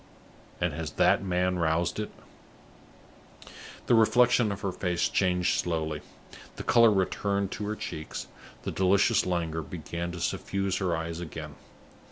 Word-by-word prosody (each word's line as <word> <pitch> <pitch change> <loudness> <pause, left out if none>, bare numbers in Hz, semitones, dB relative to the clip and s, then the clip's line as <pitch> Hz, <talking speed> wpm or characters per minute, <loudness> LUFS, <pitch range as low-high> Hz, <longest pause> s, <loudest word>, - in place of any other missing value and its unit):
And 85 -3 0
has 80 -1 -5
that - - +3
man 90 -1 0
roused 85 +3 +1
it?" 105 - -3 1.8
The - - +3
reflection 120 0 +4
of 100 - -5
her 100 -2 -1
face 90 -1 0
changed 90 -2 +1
slowly. 80 -3 -2 0.5
The - - -6
color 115 -1 +6
returned 100 0 0
to 105 - -4
her 105 - -2
cheeks, 80 -6 -6 0.4
the - - -3
delicious 95 0 +3
languor 85 -3 -1
began 85 +2 -5
to 90 - -6
suffuse 95 +2 -1
her 90 -4 0
eyes 80 0 -4
again. 80 -2 -7
90 Hz, 140 wpm, -28 LUFS, 80-100 Hz, 1.8 s, color